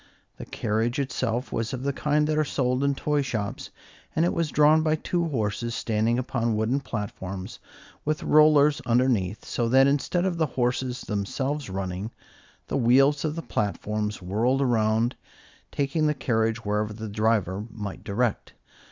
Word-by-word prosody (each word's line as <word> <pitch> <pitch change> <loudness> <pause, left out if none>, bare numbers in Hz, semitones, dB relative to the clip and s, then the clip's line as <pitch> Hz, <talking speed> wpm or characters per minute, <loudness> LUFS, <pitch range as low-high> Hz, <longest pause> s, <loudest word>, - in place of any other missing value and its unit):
The - - -8
carriage 115 +5 -1
itself 130 -3 -2
was 115 +3 -2
of 130 0 -4
the 140 0 0
kind 150 +2 +1
that 155 0 0
are 155 - +3
sold 130 -2 0
in 140 0 +2
toy 150 +1 0
shops, 110 -6 -4 0.5
and 165 - +3
it - - +1
was 165 -2 0
drawn 150 +2 +5
by 155 0 +2
two 170 +2 -1
horses 115 -3 -2
standing 115 +1 0
upon 120 -3 -1
wooden 110 +6 +1
platforms 100 -6 -6 0.4
with 155 0 -1
rollers 150 -1 +5
underneath, 115 -5 +1
so 120 -1 -1
that 135 +2 +6
instead 145 +6 +1
of 180 -3 -1
the 160 - +2
horses 125 0 -1
themselves 130 +7 -3
running, 95 +2 -4 0.6
the - - -2
wheels 135 +3 +4
of 155 -1 -1
the 165 - -5
platforms 105 0 -2
whirled 120 +9 +1
around, 115 -1 +1 0.6
taking 145 +2 0
the 150 - +1
carriage 115 -3 0
wherever 105 +1 -1
the 110 +1 -6
driver 105 -1 0
might 105 -3 -7
direct. 110 +2 -1
125 Hz, 160 wpm, -26 LUFS, 110-145 Hz, 0.6 s, that